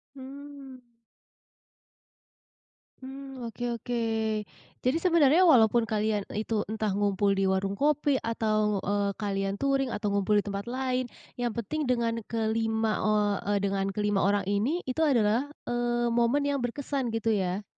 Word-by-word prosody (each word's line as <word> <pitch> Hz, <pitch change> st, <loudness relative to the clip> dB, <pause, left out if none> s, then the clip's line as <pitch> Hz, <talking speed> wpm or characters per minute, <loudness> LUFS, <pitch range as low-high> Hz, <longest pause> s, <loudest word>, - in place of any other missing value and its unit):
Hmm. 275 Hz, 0 st, -10 dB, 2.2 s
Mmm, 265 Hz, -2 st, -8 dB
oke 230 Hz, +1 st, -7 dB, 0.2 s
oke. 240 Hz, +2 st, -3 dB, 0.8 s
Jadi 255 Hz, +5 st, +2 dB
sebenarnya 335 Hz, -2 st, +4 dB
walaupun 235 Hz, -5 st, +5 dB
kalian 215 Hz, -1 st, 0 dB
itu 215 Hz, 0 st, -1 dB
entah 215 Hz, -1 st, -2 dB
ngumpul 200 Hz, 0 st, +1 dB
di 195 Hz, 0 st, +1 dB
warung 190 Hz, +1 st, 0 dB
kopi 290 Hz, -2 st, +2 dB
atau, 215 Hz, -3 st, 0 dB
eee, 200 Hz, 0 st, 0 dB
kalian 195 Hz, -1 st, -2 dB
touring 275 Hz, -1 st, +1 dB
atau 205 Hz, -1 st, -2 dB
ngumpul 200 Hz, +1 st, +1 dB
di -, -, -1 dB
tempat 200 Hz, +1 st, -5 dB
lain, 255 Hz, 0 st, -1 dB, 0.3 s
yang 240 Hz, -1 st, 0 dB
penting 270 Hz, +6 st, -3 dB
dengan 235 Hz, -2 st, 0 dB
kelima 220 Hz, -1 st, 0 dB
eee 210 Hz, -1 st, +2 dB, 0.2 s
eee, -, -, +3 dB
dengan 195 Hz, 0 st, 0 dB
kelima 210 Hz, -1 st, +1 dB
orang 200 Hz, 0 st, +2 dB
ini, 225 Hz, -, 0 dB
itu 255 Hz, +4 st, -4 dB
adalah, 240 Hz, -2 st, +2 dB, 0.2 s
eee, 240 Hz, 0 st, 0 dB
momen 240 Hz, +5 st, +2 dB
yang 285 Hz, -1 st, 0 dB
berkesan, 265 Hz, +2 st, -2 dB
gitu 225 Hz, 0 st, 0 dB
ya? 190 Hz, -1 st, -1 dB
230 Hz, 140 wpm, -28 LUFS, 205-265 Hz, 2.2 s, walaupun